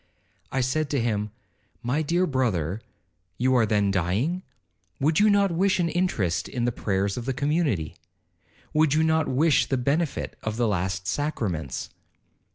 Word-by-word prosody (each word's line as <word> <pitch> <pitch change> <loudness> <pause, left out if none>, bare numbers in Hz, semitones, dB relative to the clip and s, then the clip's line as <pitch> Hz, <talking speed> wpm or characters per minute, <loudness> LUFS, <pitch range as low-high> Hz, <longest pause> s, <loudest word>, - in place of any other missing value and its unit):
I 135 - 0
said 145 +4 0
to 140 - 0
him, 105 -3 -1 0.5
'My 125 +6 0
dear 170 +4 +1
brother, 110 - -1 0.6
you 130 +1 +2
are 120 -3 +4
then 105 -2 +2
dying?—would 95 - -2
you 210 +1 +5
not 200 -2 +3
wish 190 +3 +2
an 170 -1 +1
interest 110 - 0
in 120 -3 -2
the 120 - +1
prayers 100 -2 -1
of 120 - -4
the 135 - -1
community?—would 145 - -2
you 160 - +3
not 160 -1 +2
wish 145 +3 +3
the 135 - 0
benefit 140 +5 -1
of 110 0 -3
the 120 -1 +2
last 95 -1 -1
sacraments?' 95 - -2
125 Hz, 150 wpm, -25 LUFS, 100-155 Hz, 0.6 s, you